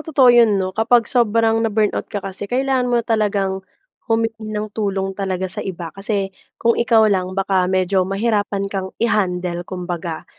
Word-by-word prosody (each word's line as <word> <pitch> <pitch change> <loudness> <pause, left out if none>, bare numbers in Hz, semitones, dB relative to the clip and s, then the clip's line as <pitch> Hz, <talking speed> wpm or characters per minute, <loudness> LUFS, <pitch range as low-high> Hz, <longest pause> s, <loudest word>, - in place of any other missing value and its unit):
totoo 270 -6 +4
'yon 230 -4 +5
'no, 185 -1 -2
kapag 230 +3 +3
sobrang 225 -1 +2
na-burnout 215 -2 0
ka 205 -2 -5
kasi, 195 +1 -3
kailangan 260 0 0
mo 245 - +2
na - - -11
talagang 200 -3 0 0.5
humingi 225 -1 -1
ng 215 0 -4
tulong 195 -2 -2
talaga 190 -1 -3
sa - - -2
iba. 170 -4 -6
Kasi 195 0 -1 0.3
kung 235 0 +1
ikaw 230 -2 +4
lang, 185 -1 -1
baka 190 -2 +1
medyo 185 0 +1
mahirapan 205 -1 0
kang 190 -1 -3
i-handle, 180 -6 -1
kumbaga. 175 -3 -5
205 Hz, 160 wpm, -19 LUFS, 190-225 Hz, 0.5 s, yon